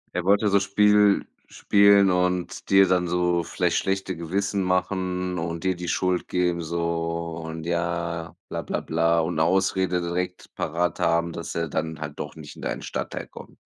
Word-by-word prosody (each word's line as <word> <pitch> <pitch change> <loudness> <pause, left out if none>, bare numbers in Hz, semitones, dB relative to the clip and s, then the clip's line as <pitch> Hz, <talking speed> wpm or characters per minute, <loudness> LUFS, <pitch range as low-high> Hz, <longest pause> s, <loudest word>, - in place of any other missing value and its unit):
Er 90 -1 -1
wollte 100 +2 +4
so 100 0 +4
Spiel 105 +1 +4 0.2
spielen 100 -1 +4
und 90 -1 -1
dir 95 -1 +6
dann 90 -1 +2
so 90 0 +1
vielleicht - - 0
schlechte 95 -1 -1
Gewissen 95 +4 -1
machen 90 -1 -1
und 85 0 -4
dir 95 0 +1
die 90 0 -6
Schuld 90 0 0
geben 90 -1 0
so 85 0 -2
und 80 0 -6
ja 85 -1 -2
bla - - -4
bla - - -3
bla 85 +1 +2
und 80 0 -2
Ausrede 95 +1 +2
direkt 90 +1 -4
parat 85 +1 -1
haben, 85 0 +1
dass 85 - -6
er 85 -1 -1
dann 80 +1 -3
halt 75 -1 -7
doch 75 - -6
nicht 75 -2 -10
in - - -12
deinen - - -4
Stadtteil - - -4
kommt. - - -13
90 Hz, 170 wpm, -25 LUFS, 85-95 Hz, 0.2 s, dir